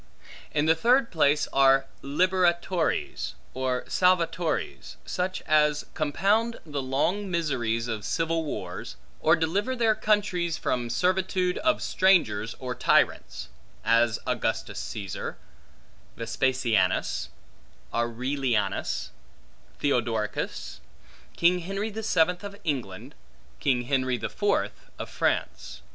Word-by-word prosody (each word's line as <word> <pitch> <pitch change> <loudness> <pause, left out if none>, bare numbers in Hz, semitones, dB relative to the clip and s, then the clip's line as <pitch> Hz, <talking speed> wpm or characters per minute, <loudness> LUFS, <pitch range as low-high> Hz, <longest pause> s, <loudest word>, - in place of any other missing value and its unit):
In 150 0 +1
the 160 - +5
third 235 +8 +3
place 150 -3 +3
are 135 0 +5 0.2
liberatores, 175 +2 +1 0.2
or 130 -1 -1
salvatores, 170 - 0
such 185 +1 -2
as 150 -1 +3
compound 200 +9 +1
the 145 -3 -3
long 160 +10 0
miseries 120 -9 -1
of 110 -3 -3
civil 165 +6 0
wars, 150 - -5 0.2
or 160 +2 +5
deliver 195 +10 0
their 230 -3 +3
countries 195 -6 +1
from 120 -1 -1
servitude 180 +5 +1
of 315 0 +1
strangers 115 - +2
or 125 -1 -4
tyrants; - - +1 0.4
as 115 -1 +3
Augustus - - -2
Caesar, 100 -4 -5 0.8
Vespasianus, 115 -4 +1 0.7
Aurelianus, 120 -3 -1 0.7
Theodoricus, 115 -6 -1 0.6
King 175 +1 +4
Henry 195 +5 -3
the 220 +2 -5
Seventh 180 -3 +2
of 200 0 -7
England, 125 - -3 0.5
King 125 -3 +1
Henry 130 -1 0
the - - -4
Fourth - - -1
of - - -6
France. - - -2
155 Hz, 105 wpm, -27 LUFS, 125-185 Hz, 0.8 s, the